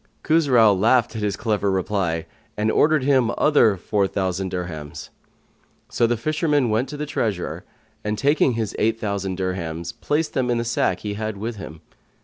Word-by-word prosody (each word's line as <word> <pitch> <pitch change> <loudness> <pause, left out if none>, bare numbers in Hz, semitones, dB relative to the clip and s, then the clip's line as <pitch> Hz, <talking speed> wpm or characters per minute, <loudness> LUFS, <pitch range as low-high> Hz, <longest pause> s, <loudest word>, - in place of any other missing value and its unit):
Khusrau 130 -10 +4
laughed 115 +5 +2
at 110 - -3
his 105 -1 0
clever 105 -3 0
reply 95 -4 -1 0.3
and 105 +1 +1
ordered 155 -3 +3
him 130 -4 +3
other 120 -9 +4
four 100 +2 0
thousand 95 -1 -2
dirhams. 85 -5 -6 0.8
So 115 - +2
the 120 0 0
fisherman 150 -1 +1
went 115 +5 0
to 150 - -6
the 150 - -3
treasurer 105 -10 -3 0.4
and, 105 0 -2
taking 140 0 +3
his 110 -2 -3
eight 115 +1 +1
thousand 100 -3 -3
dirhams, 85 -2 -3
put 150 +7 -1
them 130 -3 0
in 120 -1 +1
a 115 - -2
sack 95 -6 0
he 105 -1 -3
had 110 0 -4
with 110 +2 -4
him. 80 -5 -9
110 Hz, 170 wpm, -22 LUFS, 95-125 Hz, 0.8 s, Khusrau